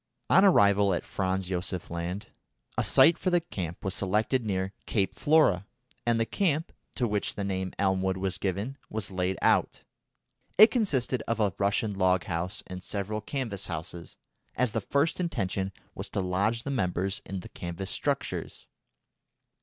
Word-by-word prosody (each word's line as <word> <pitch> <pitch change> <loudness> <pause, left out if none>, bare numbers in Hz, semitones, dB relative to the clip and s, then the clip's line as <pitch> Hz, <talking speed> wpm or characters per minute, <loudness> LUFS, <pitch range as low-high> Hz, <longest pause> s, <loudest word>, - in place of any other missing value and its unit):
On 190 - +7
arrival 100 - +5
at - - -3
Franz 95 -1 -1
Josef 90 -1 -3
Land, 85 +4 -3 0.5
a - - +1
site 165 - +6
for 185 - 0
the 175 -1 +4
camp 95 - -6
was 95 - 0
selected 105 +6 +1
near 95 -2 -2
Cape 100 -4 +1
Flora, 145 - +3 0.4
and 115 -1 +3
the 115 - +2
camp, 165 - 0 0.2
to 125 - +1
which 105 -1 -1
the 100 - -3
name 95 -1 -2
Elmwood 95 -1 +1
was 95 0 -2
given, 100 +9 -2
was 110 -2 -3
laid 95 0 -1
out. - - +2 0.7
It 215 +2 +9
consisted 135 - +1
of 115 -1 0
a 105 -3 +2
Russian 100 +1 +1
log 95 -2 +2
house 90 +1 -3
and 90 0 -8
several 105 +1 -3
canvas 110 -5 -3
houses, 85 +1 -6 0.4
as 125 -2 +1
the 115 - -1
first 140 - +1
intention 95 - -1 0.2
was - - -6
to - - -2
lodge 100 +5 0
the 140 - -3
members 95 -5 -1
in 95 -1 -5
the - - -11
canvas 85 +2 -5
structures. - - -2
100 Hz, 160 wpm, -28 LUFS, 95-115 Hz, 0.7 s, It